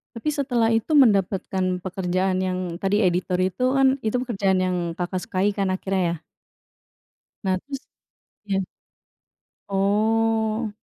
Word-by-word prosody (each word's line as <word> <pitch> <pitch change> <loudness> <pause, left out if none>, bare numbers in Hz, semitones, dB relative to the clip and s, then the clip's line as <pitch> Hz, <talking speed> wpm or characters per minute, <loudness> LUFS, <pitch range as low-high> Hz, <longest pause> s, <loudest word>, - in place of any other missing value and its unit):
Tapi 230 - -9
setelah 245 -5 +1
itu 225 +6 -1
mendapatkan 190 -5 +2
pekerjaan 185 0 -1
yang 185 -1 -1 0.2
tadi 200 +2 +2
editor 180 +1 0
itu 185 +7 0
kan 265 0 +5
itu 220 +3 0
pekerjaan 200 -6 0
yang 185 -1 0 0.2
Kakak, 180 +1 -2
sukai 195 +2 0
kan 195 -2 0
akhirnya 185 -2 0
ya? - - -31 1.2
Nah 190 -1 +2
terus, 275 -1 -6 0.7
iya. 195 -1 +1 1.1
Oh. 220 +2 +1
195 Hz, 120 wpm, -24 LUFS, 185-225 Hz, 1.2 s, kan